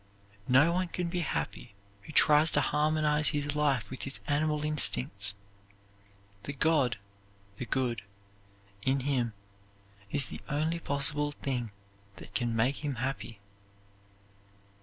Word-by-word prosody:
No 140 +7 +5
one 180 +1 0
can 175 0 -3
be 175 +1 -2
happy 140 -9 -4 0.3
who 125 - -11
tries 150 +1 +6
to - - +3
harmonize 150 0 +2
his 145 0 0
life 140 -8 +1
with 130 - -6
his 135 - -5
animal 150 +1 0
instincts. 125 -9 +3 1.1
The 140 +6 -6
God 140 -5 +2 0.6
(the 125 - -5
good) 120 -5 -1 0.8
in 135 +4 +1
him 125 -4 -1 0.8
is 140 +5 +2
the - - -8
only 155 +3 -1
possible 145 0 0
thing 125 -5 -3 0.5
that - - -13
can 120 -2 -1
make 130 +6 0
him 145 -3 -2
happy. 120 -4 -5
140 Hz, 125 wpm, -30 LUFS, 125-150 Hz, 1.1 s, tries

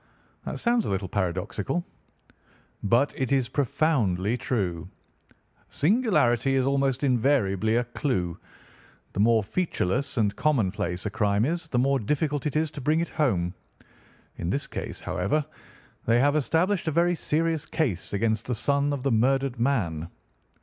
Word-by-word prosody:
"That - - -4
sounds 235 -1 +2
a - - -2
little 95 0 -1
paradoxical." 95 - -2 1.0
"But 120 +8 +2
it 130 0 -2
is 135 -3 +2
profoundly 120 - +1
true. 95 -9 -2 0.8
Singularity 140 - +2
is 130 -1 +2
almost 135 -1 +1
invariably 115 -5 +2
a 120 - +2
clue. 115 - -2 0.8
The - - -4
more 110 +1 +4
featureless 135 - -1
and 105 -3 +1
commonplace 100 - 0
a 105 - -2
crime 100 +2 +1
is, 170 +2 -2
the 130 - -2
more 135 +2 +2
difficult 145 +5 -1
it 150 - -4
is 155 0 +1
to 145 -2 -7
bring 155 +5 +2
it 170 - -1
home. 95 - 0 0.8
In 85 - -3
this 140 +9 -1
case, - - -6
however, 140 +12 -1 0.6
they 115 +1 +4
have 145 +3 +3
established 165 +6 +1
a - - +2
very 170 +3 +3
serious 160 -1 -1
case 120 - -1
against 110 +2 0
the 125 - -1
son 140 +4 +1
of 135 -3 -4
the 135 - +1
murdered 130 +2 +1
man." 95 - 0
130 Hz, 150 wpm, -26 LUFS, 100-150 Hz, 1.0 s, more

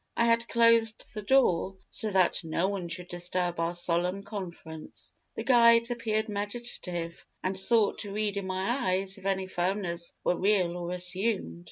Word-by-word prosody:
I 235 - +3
had 230 0 +2
closed 230 -1 +2
the 215 - -5
door, 200 -6 +2 0.2
so 220 - -1
that 190 -3 +2
no 165 +3 -1
one 195 -4 -4
should 175 +1 -5
disturb 175 0 -2
our 165 +1 -1
solemn 175 +3 -1
conference. 170 -6 -9 0.2
The - - -4
guides 235 -1 +5
appeared 220 -2 -1
meditative, 200 -5 -5 0.2
and 185 +1 -1
sought 210 +2 +5
to 205 - -6
read 210 0 -2
in 200 -1 -4
my 190 +1 -2
eyes 195 -6 0
if - - -16
my 190 -1 0
firmness 175 -2 -2
were - - +1
real 185 -3 +1
or 175 -1 -5
assumed. 180 - +1
190 Hz, 165 wpm, -28 LUFS, 175-220 Hz, 0.2 s, guides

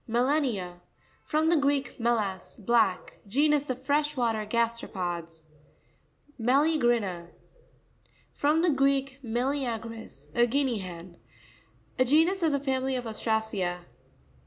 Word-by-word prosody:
Mera'n1a.—From 245 - -1
the 340 - +4
Greek, 280 -3 0
melas, 215 -6 -1
black. 215 -3 +1
Genus 290 +5 +2
of 255 0 -4
fresh 295 +1 +1
water 225 -3 0
gas 235 +1 0
teropods. 170 -4 -5 1.0
Me 235 +2 +1
racrina.—From 275 - -1
the 350 - +4
Greek, 275 -1 +1
me 235 0 -1
leagris, 230 - -4
a 240 +5 +4
guinea 260 -2 +1
hen. 175 -1 -9 0.8
A 255 - +5
genus 325 +8 +3
of 325 -2 +2
the 280 - +1
family 265 -1 -1
of 250 -1 -3
Ostracea. 220 -5 -2
240 Hz, 110 wpm, -28 LUFS, 210-280 Hz, 1.0 s, A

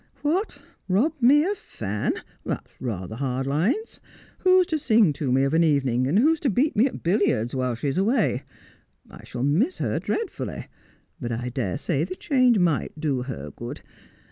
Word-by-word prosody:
' 265 - -34
What! 350 +9 0 0.3
rob 220 - +2
me 290 +6 +6
of 405 +1 -2
Fan! 105 -1 -3 0.3
That's - - -5
rather 110 -4 -4
hard 130 0 -2
lines. 185 - -1 0.4
"Who's 370 0 +5
to 315 -2 -1
sing 220 - +4
to 140 -2 -2
me 135 +1 +3
of 135 +2 0
an 165 +1 +4
evening, 135 -5 +2
and 155 +8 +2
who's 310 +7 +4
to 285 - +1
beat 260 +9 +1
me 230 +6 +4
at - - -8
billiards, 170 - +1
while 130 -2 -1
she's 135 +7 -1
away 205 - +2 0.3
] - - -33
I - - -12
shall 125 0 -5
miss 190 - +2
her - - -1
dreadfully; 450 -4 -4 0.5
but 120 -3 -4
I 120 +2 -3
dare 120 -7 -2
say 150 0 -1
the 185 +2 -4
change 255 - +3
might 165 -4 0
do 145 -5 0
her 75 - -6
good. - - -8
160 Hz, 185 wpm, -25 LUFS, -, 0.5 s, me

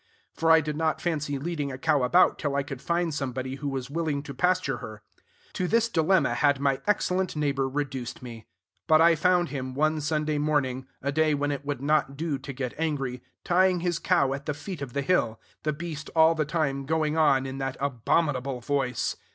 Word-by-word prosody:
for 165 - 0
I 160 0 +7
did 150 -1 -4
not 160 0 0
fancy 150 -4 -2
leading 145 -1 -3
a 130 - -6
cow 150 0 +2
about 170 +9 +4
till 145 -2 -1
I 140 - +1
could 140 -2 -7
find 170 -1 0
somebody 130 -1 -3
who 145 0 -3
was 135 -1 -4
willing 155 -3 -1
to 140 - -7
pasture 180 -4 +1
her. 110 -4 -9 0.5
To 180 - -1
this 230 +3 +3
dilemma 165 - +2
had 140 +3 +2
my 140 -1 +1
excellent 190 -3 +1
neighbor 140 -3 0
reduced 135 -3 -4
me. 115 -3 -9 0.4
But 155 0 +6
I 165 +1 +6
found 175 +2 +2
him, 130 -2 -5
one 155 +2 +1
Sunday 150 0 0
morning, 130 -4 0 0.2
a 140 - 0
day 155 +1 +2
when 145 0 -1
it 145 0 -4
would 140 -2 -3
not 145 -2 +1
do 155 -3 -2
to 135 +1 -7
get 130 -2 -4
angry, 135 -6 -2 0.2
tying 180 0 +3
his 175 -1 -1
cow 165 -7 +2
at 140 0 -7
the 150 - -1
foot 170 +1 -7
of 130 -4 -6
the 140 - -1
hill; 120 -9 +1 0.2
the 155 - 0
beast 155 0 -6
all 160 0 +6
the 155 -2 -1
time 140 -4 -1
going 155 -1 +1
on 140 -4 +3
in 135 0 -5
that 135 -1 -3
abominable 135 0 0
voice. 130 -1 -1
145 Hz, 205 wpm, -27 LUFS, 135-160 Hz, 0.5 s, I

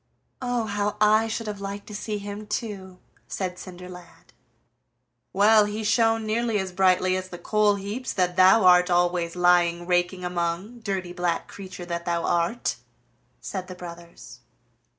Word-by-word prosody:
"Oh, 245 -2 -1
how 205 0 -2
I 215 +1 +4
should 225 +1 -4
have 205 -2 -5
liked 200 +1 -6
to 210 - -10
see 210 +1 -4
him 205 +1 -7
too!" 195 -5 -5 0.3
said 180 -2 -4
Cinderlad. 180 -1 -12 1.0
"Well, 210 +2 +5
he 210 +1 -4
shone 225 +1 +2
nearly 225 0 0
as 190 -2 -3
brightly 185 0 +3
as 185 0 -4
the 175 - -8
coal 210 +3 +2
heaps 205 +6 -5
that 180 -2 0
thou 190 +3 +6
art 180 0 +6
always 175 -1 +1
lying 175 -1 +3
raking 180 +1 0
among, 180 +6 -3
dirty 190 -5 -4
black 175 -2 -1
creature 185 -2 -9
that 170 0 -4
thou 170 -1 -1
art!" 175 +8 0 0.6
said 185 -2 -5
the 185 - -8
brothers. 170 -7 -11
185 Hz, 150 wpm, -25 LUFS, 175-210 Hz, 1.0 s, thou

